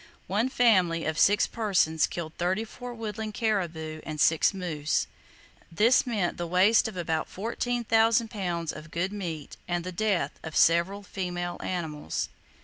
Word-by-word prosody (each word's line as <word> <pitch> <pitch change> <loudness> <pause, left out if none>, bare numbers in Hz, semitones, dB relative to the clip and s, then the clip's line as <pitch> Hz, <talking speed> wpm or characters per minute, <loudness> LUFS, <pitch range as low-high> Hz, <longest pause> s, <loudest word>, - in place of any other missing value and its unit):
one 215 +7 0
family 185 -10 +3
of 160 0 -1
six 205 +1 +5
persons 185 -8 +1
killed 160 -2 -6
thirty 185 +5 +1
four 245 +2 -8
woodland 220 -2 -5
caribou 165 -8 -2
and 155 -1 -6
six 160 +2 +4
moose. 165 -6 -1 0.7
This 225 +10 +4
meant 205 -7 -1
the 175 - -3
waste 195 +7 +4
of 215 -4 -7
about 160 -2 -1
14,000 230 +1 +1
pounds 175 -6 -2
of 155 +1 -10
good 180 +5 -2
meat, 165 -7 -5
and 175 -1 -1
the 185 - -5
death 200 0 -1
of 160 -1 -7
several 170 +5 +3
female 175 -3 -4
animals. 155 - -3
180 Hz, 145 wpm, -28 LUFS, 165-215 Hz, 0.7 s, six